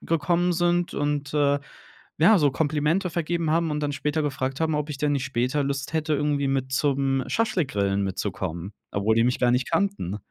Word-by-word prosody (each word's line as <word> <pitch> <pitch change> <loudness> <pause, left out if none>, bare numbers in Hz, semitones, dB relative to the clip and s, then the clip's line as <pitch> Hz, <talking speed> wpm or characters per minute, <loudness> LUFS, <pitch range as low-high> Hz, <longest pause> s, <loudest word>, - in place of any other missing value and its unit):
gekommen 170 +2 +1
sind 175 0 +1
und, 145 0 -2
äh, 145 -1 +3 0.6
ja, 205 +6 +6
so 145 -3 +3
Komplimente 155 +5 0
vergeben 170 -1 -1
haben 165 0 +1
und 150 0 -2
dann 145 -1 -1
später 150 +2 -1
gefragt 135 -2 -2
haben, 160 -1 +1
ob 150 0 -1
ich 140 - -4
denn 150 0 +1
nicht 140 -1 -1
später 135 +3 0
Lust 140 +2 -3
hätte, 155 -1 0
irgendwie 145 -1 0
mit 130 -1 -1
zum 135 -1 +1
Schaschlik-Grillen 130 - 0
mitzukommen, 95 -1 -4 0.2
obwohl 105 +3 +1
die 115 - +4
mich 125 - +1
gar 125 - +3
nicht 125 +1 0
kannten. 195 - 0
145 Hz, 185 wpm, -25 LUFS, 130-160 Hz, 0.6 s, ja